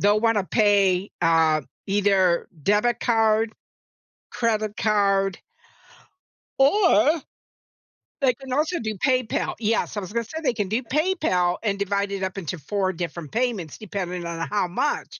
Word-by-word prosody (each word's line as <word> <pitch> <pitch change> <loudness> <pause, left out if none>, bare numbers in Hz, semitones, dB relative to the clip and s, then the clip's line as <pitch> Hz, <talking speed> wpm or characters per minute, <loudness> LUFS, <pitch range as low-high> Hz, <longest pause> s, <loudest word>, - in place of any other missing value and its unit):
they'll 205 +1 +4
want 225 -2 +2
to 190 - -1
pay, 200 -3 +2
uh, 160 -2 +3 0.3
either 195 -3 +2
debit 210 - +2
card, 225 -1 +2 0.8
credit 215 -3 -1
card 195 -3 +1 1.2
or, 295 - +5 1.1
they 260 -3 +4
can 265 0 -8
also 310 +5 0
do 220 -2 -3
PayPal 255 +2 0
Yes, 225 0 0
I - - +1
was 190 +2 -8
gonna 235 0 0
say 315 +8 -7
they 255 -4 +2
can 205 -4 -2
do 225 +5 -1
PayPal, 240 - +1
and 200 -2 0
divide 200 0 -1
it 195 -1 -3
up 190 +1 -3
into 180 -1 -4
4 190 +5 -1
different 170 -2 -6
payments 225 - -2
depending 180 -4 -5
on 165 -1 -4
how 205 -3 0
much. 285 +12 -2
205 Hz, 145 wpm, -24 LUFS, 185-230 Hz, 1.2 s, or